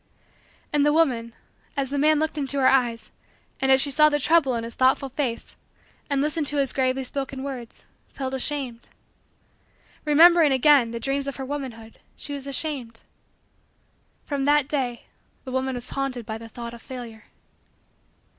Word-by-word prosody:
And 295 -1 +3
the 295 - +4
woman, 250 -8 +1 0.4
as 275 -1 -1
the 285 - -1
man 305 +2 +4
looked 315 +1 -1
into 280 -2 -1
her 265 - +2
eyes 240 -4 +1 0.5
and 265 0 +2
as 265 - +6
she 280 +1 +2
saw 305 +2 +6
the 295 -1 0
trouble 290 -3 +3
in 230 - -3
his 230 0 -7
thoughtful 265 +1 +2
face 255 -3 -4 0.5
and 280 -1 +1
listened 300 +1 -1
to 295 - -1
his 275 -2 0
gravely 265 0 0
spoken 270 0 -5
words, 255 -4 -7 0.3
felt 265 -1 -5
ashamed. 265 -3 -3 1.2
Remembering, 320 +1 +6
again, 265 -2 +5
the 235 0 -5
dreams 275 +3 -1
of 280 - -4
her 265 - -5
womanhood, 255 -6 -7 0.2
she 290 - -6
was 280 -1 -6
ashamed. 265 -5 -4 1.2
From 280 -2 -2
that 290 -1 +3
day, 255 -5 -2 0.4
the 260 - -7
woman 260 0 -1
was 245 0 -6
haunted 270 -4 -3
by 220 0 -5
the 225 0 -10
thought 235 +1 -7
of 235 - -11
Failure. 235 -4 -9
270 Hz, 165 wpm, -24 LUFS, 245-290 Hz, 1.2 s, as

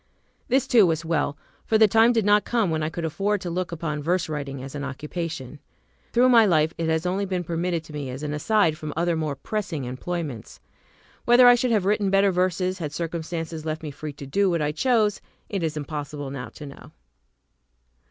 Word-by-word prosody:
This 265 0 +2
too 235 -7 +5
was 165 0 -1
well, 160 -3 0 0.3
for 220 - +2
the 220 0 +6
time 225 +3 +5
did 225 -4 +1
lot 205 0 +4
come 225 -7 0
when 160 0 -1
I 155 - -1
could 165 0 -4
afford 200 +6 0
to 175 - -4
look 180 +1 -2
upon 155 -3 -3
verse 175 +3 0
writing 140 -3 -5
as 135 - -8
an 145 -1 -5
occupation. 150 0 -5 0.5
Through 250 +2 +4
my 235 -2 +7
life, 160 -5 +3
it 165 -1 0
has 160 +1 0
only 190 +3 0
been 185 -2 -2
permitted 170 0 -2
to 155 - -13
me 145 -3 -4
as 130 +3 -6
an 150 0 -3
aside 160 0 +2
from 155 -1 -5
other 170 0 +1
more 155 -3 -2
pressing 185 -1 -4
employments. 135 0 -5 0.7
Whether 245 +1 +7
I 245 - +9
should 245 +1 +1
have 215 -5 +2
written 205 0 +2
better 195 0 +4
verses 185 +1 0
had 150 -4 -4
circumstances 165 0 -4
left 155 0 -4
me 150 - -5
free 150 +1 -7
to 140 - -9
do 195 +8 +1
what 170 -2 +1
I 150 -1 0
chose, 215 +3 +1 0.3
it 200 -3 -2
is 160 -2 -2
impossible 145 -1 -5
now 125 -4 -6
to 150 - -11
know. 140 - -12
165 Hz, 210 wpm, -24 LUFS, 150-200 Hz, 0.7 s, I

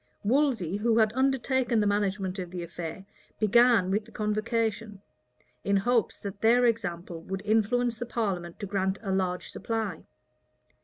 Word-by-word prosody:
Wolsey, 225 - +1
who 225 +2 +2
had 220 -1 +3
undertaken 260 -2 +1
the 210 - +2
management 200 -2 0
of 180 -2 -5
the 175 -1 -5
affair, 170 +2 -7 0.3
began 225 -3 +4
with 205 +2 0
the 225 - -16
convocation, 215 0 -2 0.6
in 200 0 +2
hopes 235 +3 +1
that 200 0 -7
their 240 +2 +5
example 175 -7 -2
would 190 +3 -5
influence 225 +2 +1
the 240 - -4
parliament 185 -8 -3
to - - -2
grant 190 -1 -1
a 195 - -2
large 185 -1 -1
supply. 220 -7 -3
210 Hz, 150 wpm, -28 LUFS, 190-230 Hz, 0.6 s, their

